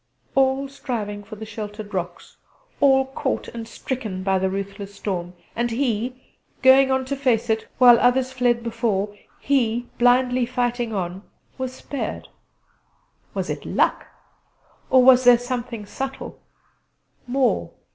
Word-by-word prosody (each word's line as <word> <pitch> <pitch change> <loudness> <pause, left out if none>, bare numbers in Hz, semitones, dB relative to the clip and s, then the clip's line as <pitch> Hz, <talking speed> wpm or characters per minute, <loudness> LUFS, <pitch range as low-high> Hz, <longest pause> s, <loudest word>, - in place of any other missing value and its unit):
All 270 +1 +2
striving 220 -7 -4
for 215 +2 -10
the 220 +1 -8
sheltering 210 -1 -7
rocks; 185 -4 -5 0.4
all 265 -1 +5
caught 265 - -3
and 230 -1 -7
stricken 225 -6 -5
by 190 0 +2
the 190 0 0
ruthless 200 +1 -5
storm; 180 -3 -4 0.2
and 240 +1 0
he, 250 0 -3 0.2
going 265 +1 +7
on 265 0 +1
to 280 +2 -2
face 240 -4 +1
it, 220 0 -1
while 245 -2 +8
others 255 +1 +2
fled 245 -2 +1
before 220 -3 -1 0.2
he, 245 -3 0
blindly 250 0 +3
fighting 245 -2 -1
on 185 -2 -3 0.4
was 260 -1 -3
spared. 275 +1 -5 1.1
Was - - -2
it - - -4
luck? - - 0 0.8
Or 260 -1 +6
was 255 0 +7
there 245 -1 +8
something 240 -3 -5
subtle, 265 +5 -6 0.9
more? 255 0 +1
240 Hz, 135 wpm, -23 LUFS, 210-260 Hz, 1.1 s, while